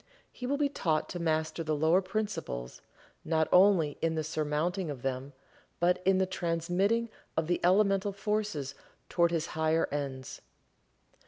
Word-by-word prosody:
He 250 - -6
will 285 +2 0
be 290 0 +2
taught 165 - -1
to 175 - -5
master 160 0 0
the 155 -1 0
lower 160 +5 +3
principles, 185 - -4 0.4
not 160 -1 +1
only 180 -5 +5
in 165 0 +1
the 155 - -1
surmounting 155 +4 -1
of 135 -4 -6
them, 135 +1 -3 0.5
but 180 +1 +2
in 190 -1 +5
the 190 - +3
transmitting 185 +5 0 0.3
of 160 - +2
the 175 +2 0
elemental 195 +2 +3
forces 200 -8 -2 0.4
toward 170 -1 +3
his 165 -2 -1
higher 160 +1 +2
ends. 135 -3 -4
165 Hz, 150 wpm, -30 LUFS, 155-190 Hz, 0.5 s, only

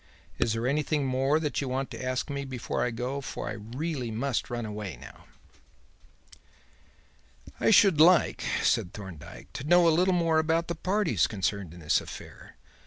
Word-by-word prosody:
Is 115 - +2
there 115 +1 -2
anything 145 +1 0
more 135 +3 +2
that 150 -2 -2
you 135 - -3
want 135 +1 -2
to - - -7
ask 130 0 -1
me 140 -1 -4
before 130 -3 -3
I 125 - +1
go, 125 +4 -3
for - - -6
I - - -4
must 105 +2 -11
really 145 -5 -3 0.4
run 120 -1 -3
away 105 -6 -6
now?" - - -13 2.3
"I - - +3
should 195 -7 +6
like," 175 0 +5 0.2
said 90 - +1
Thorndyke, 95 -7 -10
"to - - -5
know 175 +3 +5
a 165 - +5
little 180 +3 +3
more 165 -2 +2
about 165 +1 0
the - - 0
parties 185 +2 +1
concerned 100 -3 -2
in 85 +1 -12
this 75 - +2
affair. - - -11
135 Hz, 175 wpm, -28 LUFS, 115-160 Hz, 2.3 s, should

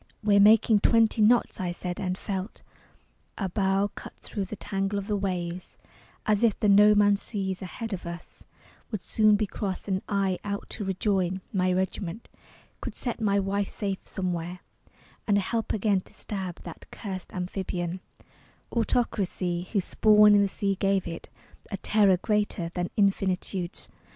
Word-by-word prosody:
"We're 205 -1 +4
making 215 +1 +6
twenty 225 +1 +3
knots," 235 +3 +3
I 180 -1 -1
said; 175 +1 -5
and 185 -2 -2
felt 195 +1 -5 0.7
Our 195 -3 -2
bow 195 +1 +1
cut - - -10
thro 205 - -4
the 190 +3 -6
tangle 195 0 -2
of 200 - -3
the 210 0 -1
waves 180 -3 -3 0.5
As 215 +1 +2
if 225 -4 +3
the 210 - +2
No 210 +1 +7
Man's 205 -1 +4
Sea 195 -3 -3
ahead 220 +4 -5
of 175 -2 -5
us 170 0 -9 0.5
Would 215 -5 -4
soon 215 -1 +4
be 210 +1 +1
crossed; 195 -1 -4
and 190 -1 0
I, 195 -2 0
out 200 0 -4
to 215 - -4
rejoin 190 -1 0
My 185 -2 +2
regiment, 190 +2 -3 0.5
could - - -5
set 240 -2 -2
my 200 -2 +2
wife 200 +1 -1
safe 195 -3 -3
somewhere, 180 -1 -4 0.7
And 205 -2 +4
help 225 +3 -1
again 205 -2 +1
to - - -19
stab 190 -4 -6
that 170 - -10
curst 190 -4 -7
amphibian, 180 -1 -3 0.7
Autocracy 190 -7 -1
whose 200 -5 0
spawn 210 -1 +6
in 205 - +6
the 200 - +3
sea 195 0 -1
gave 195 0 +1
it 165 0 -7 0.4
A 200 - -3
terror 200 -1 +3
greater 205 -4 -1
than 175 0 -2
infinitude's. 190 -2 0
195 Hz, 160 wpm, -27 LUFS, 185-210 Hz, 0.7 s, No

